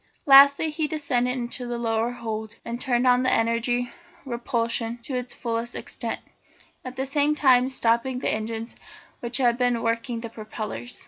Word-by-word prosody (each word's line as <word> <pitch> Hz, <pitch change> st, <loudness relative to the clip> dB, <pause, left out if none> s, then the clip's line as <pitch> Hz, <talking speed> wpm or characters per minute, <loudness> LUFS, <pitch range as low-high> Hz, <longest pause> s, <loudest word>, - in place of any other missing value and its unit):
Lastly 280 Hz, +3 st, +7 dB
he 305 Hz, 0 st, -1 dB
descended 260 Hz, -5 st, 0 dB
into 245 Hz, 0 st, -3 dB
the 240 Hz, 0 st, -3 dB
lower 225 Hz, 0 st, 0 dB
hold 220 Hz, -2 st, -5 dB
and 235 Hz, +1 st, -5 dB
turned 250 Hz, -2 st, +1 dB
on 250 Hz, 0 st, +5 dB
the 255 Hz, -, +2 dB
energy 235 Hz, +2 st, +1 dB, 0.3 s
of -, -, -30 dB
repulsion 235 Hz, -1 st, -1 dB
to 265 Hz, -, -4 dB
its 250 Hz, 0 st, -3 dB
fullest 235 Hz, 0 st, -3 dB
extent, -, -, -5 dB, 0.6 s
at 255 Hz, 0 st, -7 dB
the 265 Hz, +1 st, -2 dB
same 290 Hz, +2 st, +2 dB
time 260 Hz, -3 st, +4 dB
stopping 250 Hz, 0 st, +1 dB
the 255 Hz, -, 0 dB
engines 225 Hz, +1 st, -4 dB, 0.4 s
which 240 Hz, 0 st, -1 dB
had 240 Hz, -2 st, +2 dB
been 245 Hz, -2 st, +1 dB
working 230 Hz, +1 st, -1 dB
the 230 Hz, -, -6 dB
propellers. 215 Hz, -, -6 dB
240 Hz, 170 wpm, -25 LUFS, 230-255 Hz, 0.6 s, Lastly